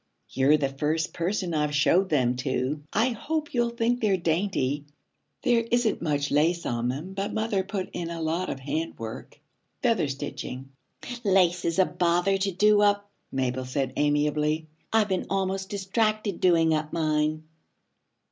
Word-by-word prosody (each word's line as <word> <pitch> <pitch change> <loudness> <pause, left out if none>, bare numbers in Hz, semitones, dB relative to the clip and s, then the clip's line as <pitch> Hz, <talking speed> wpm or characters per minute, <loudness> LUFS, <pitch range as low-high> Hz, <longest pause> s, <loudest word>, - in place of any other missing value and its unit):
'You're 140 +3 +4
the 145 -2 0
first 150 +4 -1
person 180 0 -1
I've 150 -1 0
shown 175 +6 +4
them 125 -7 +2
to. 130 +2 -1
I 225 +5 +2
hope 300 +6 -3
you'll 240 -1 +2
think 235 +1 0
they're 200 -4 +3
dainty. 160 -5 0 0.6
There 240 -3 +3
isn't 240 -2 +1
much 145 -3 -1
lace 165 +4 +2
on 120 0 -1
them, 155 +9 -5
but 195 +2 -3
mother 220 -3 0
put 190 -1 -4
in 170 -1 -4
a 170 0 -5
lot 165 +3 -1
of 135 - -4
handwork 135 -5 -5 0.4
feather 230 - +2
stitching.' 135 -1 -6 0.5
'Lace 185 -3 +3
is 165 +1 0
a 190 - +5
bother 175 +3 +1
to 195 +1 0
do 210 +3 +4
up,' 205 0 +2 0.2
Mabel 130 -1 -1
said 130 0 -2
amiably. 150 +1 +1 0.3
'I've 220 -2 +3
been 190 -1 -1
almost 190 0 -1
distracted 210 0 -1
doing 165 -3 +4
up 155 0 -1
mine.' 155 -1 0
170 Hz, 155 wpm, -26 LUFS, 150-200 Hz, 0.6 s, a